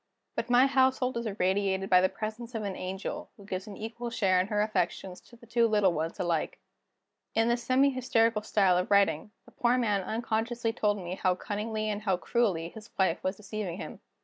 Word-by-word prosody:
But 230 - -3
my 245 +2 +6
household 260 -2 +2
is 235 -1 -2
irradiated 195 -1 0
by 180 -1 +6
the 185 - +3
presence 220 +4 -6
of 220 - -2
an 195 -2 -3
angel, 190 +11 -5
who 200 - -14
gives 190 0 -5
an 205 - -8
equal 230 +2 -5
share 195 -5 +2
in 185 - -3
her 210 0 -1
affections 185 -2 -2
to 240 - -18
the 235 - -17
two 235 0 +2
little 210 -4 +3
ones 165 +4 -3
alike." 170 -3 -1 0.8
In 225 +1 +3
this 240 0 +1
semi 265 +3 +3
hysterical 230 -4 +2
style 195 -4 +3
of 180 - -2
writing, 200 -3 +3 0.2
the - - -17
poor 245 +1 +2
man 210 -5 +1
unconsciously 225 +2 -2
told 210 -2 +1
me 180 -2 -5
how 185 -1 +3
cunningly 215 +3 -3
and 210 -1 -2
how 195 -4 +1
cruelly 185 -6 0
his 215 +3 -12
wife 185 -3 +1
was 185 +2 -1
deceiving 200 -4 -5
him. - - -8
210 Hz, 200 wpm, -29 LUFS, 190-235 Hz, 0.8 s, my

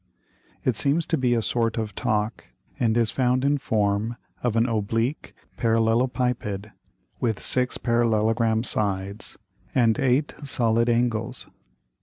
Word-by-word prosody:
It 125 - +2
seems 145 +7 +2
to 165 - +1
be 125 -4 +1
a 115 - 0
sort 115 +3 0
of 110 -2 -3
Talk, 110 -1 -1 0.3
and 115 -1 +2
is 115 -2 +2
found 130 0 +1
in 145 0 +2
form 105 0 0 0.3
of 120 -3 0
an 115 +1 +3
oblique 115 +4 -2 0.2
Parallelopiped, 115 -2 0 0.5
with 115 -3 0
six 125 -1 +1
parallelogram 115 -1 +1
Sides 100 -2 -2 0.4
and 115 -4 +3
eight 135 +3 +1
solid 115 -3 +1
Angles. 115 -2 0
115 Hz, 125 wpm, -25 LUFS, 110-125 Hz, 0.5 s, an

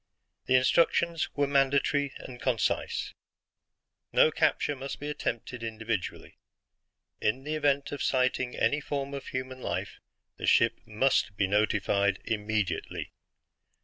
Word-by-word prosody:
The 130 - +4
instructions 165 +5 +3
were 145 - +2
mandatory 140 0 +2
and 125 -2 -10
concise: 120 -5 0 1.0
"No 155 - +5
capture 150 -1 +1
must 135 +1 -6
be 145 +1 -4
attempted 125 -4 -4
individually. 110 -4 -4 0.8
In 125 +5 0
the 150 +2 -3
event 145 -2 +1
of 145 -2 -4
sighting 130 -1 +1
any 145 +6 +2
form 140 -1 -3
of 140 - -6
human 130 0 -5
life, - - -4 0.4
the - - -4
ship 115 - +4
MUST 110 -3 +1
be 100 - +3
notified 100 -1 +2
immediately. 105 -2 -2
130 Hz, 120 wpm, -29 LUFS, 110-140 Hz, 1.0 s, No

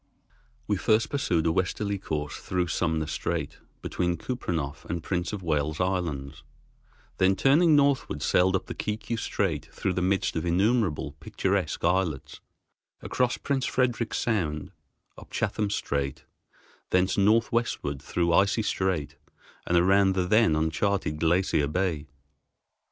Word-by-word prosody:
We - - 0
first 110 +1 +2
pursued 90 - 0
a 80 - +3
westerly 100 +3 -1
course, 75 -5 -4
through 90 -2 -2
Sumner 80 -2 0
Strait, - - -3 0.2
between 90 -1 -1
Kupreanof 80 - -4
and 85 -1 -4
Prince 90 -2 -2
of 105 -3 -5
Wales 75 -1 -1
Islands, 80 -7 -2 0.8
then, 95 +1 +4
turning 155 - +4
northward, 140 -1 +2
sailed 95 +1 +3
up 95 - -1
the - - -6
Kiku 105 +2 -3
Strait 85 -8 -2
through 95 - -2
the 90 - -1
midst 95 +1 +1
of 80 - -1
innumerable 90 - +1
picturesque - - -1
islets, 90 -5 0 0.6
across 125 -1 0
Prince 135 -2 -1
Frederick's 120 -3 0
Sound, 80 -10 -1 0.5
up - - -14
Chatham 105 -2 -1
Strait, 70 -8 -2 0.7
thence 90 +1 +2
northwestward 110 - +1
through 85 +3 0
Icy 100 +5 +3
Strait 95 -7 -1 0.5
and 85 - +3
around 95 +2 +4
the 90 -1 +1
then 105 -3 +4
uncharted 80 +1 0
Glacier 85 -3 +2
Bay. 80 -2 -1
90 Hz, 130 wpm, -27 LUFS, 80-105 Hz, 0.8 s, then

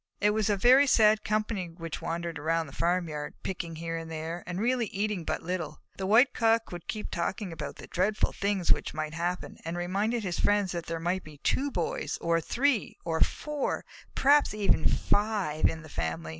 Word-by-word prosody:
It 210 +1 +4
was 215 0 +1
a 205 - +2
very 255 +7 +6
sad 215 -3 +5
company 215 -3 -1
which 165 -1 -7
wandered 170 -1 -3
around 165 +2 0
the 140 - -12
farmyard, 165 -4 -1
picking 170 -3 -4
here 165 +1 -4
and 165 0 -6
there, 165 +2 -5
and 180 +1 -3
really 240 +1 +1
eating 200 -2 -2
but - - -2
little. 170 -2 -3 0.2
The 190 - -2
White 230 +6 +6
Cock 225 -1 +2
would 175 -2 -8
keep 215 - -4
talking 180 +2 -2
about - - -6
the - - -10
dreadful 200 +4 +1
things 200 -3 0
which - - +1
might 155 0 -3
happen, 175 +2 -3
and 165 +2 -4
reminded 205 +6 0
his 180 -3 -2
friends 205 -2 +2
that 170 -2 -4
there 165 0 -3
might 175 +3 -1
be 155 -1 -12
two 280 +2 +1
Boys, 175 -10 -2
or 165 0 +1
three, 250 - 0
or 160 -1 -1
four, 300 -2 -1 0.3
perhaps 285 -4 +4
even 200 -6 +3
five 205 -7 +1
in 160 0 -3
the - - -10
family! 80 - -3
180 Hz, 195 wpm, -29 LUFS, 165-215 Hz, 0.3 s, very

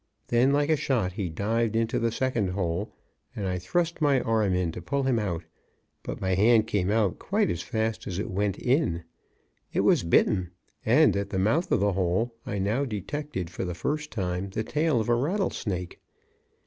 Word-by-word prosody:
Then, 120 +3 +4
like 145 +2 +2
a - - +5
shot, 120 -10 0
he 95 -3 -3
dived 110 +6 0
into 115 0 +1
the 115 0 +1
second 120 -5 0
hole, 90 +1 -2 0.4
and 100 - -3
I 90 0 -1
thrust 170 - -1
my 140 -3 +4
arm 110 -5 +1
in 90 -2 0
to 90 - -7
pull 140 +11 -1
him 130 -3 +2
out. 90 -6 -2 0.6
But - - -6
my 95 -1 0
hand 110 +3 +5
came 100 -4 0
out 105 -3 +1
quite - - +1
as 85 -1 -3
fast 110 0 -2
as 90 -3 -3
it 105 +3 -3
went 100 0 0
in. 125 - +1 0.7
It - - +1
was - - +4
bitten; 90 +2 +2 0.3
and - - +5
at 100 0 -2
the 95 - -2
mouth 110 - +1
of - - +3
the 100 -1 +2
hole 95 +6 0
I 100 - -2
now 105 +8 0
detected 120 - -4
for - - -4
the 90 -2 -3
first 150 - -2
time 95 -2 -3
the 110 +3 -2
tail 150 0 +1
of 110 - -2
a 120 - +3
rattlesnake. 120 - -1
105 Hz, 195 wpm, -27 LUFS, 95-125 Hz, 0.7 s, a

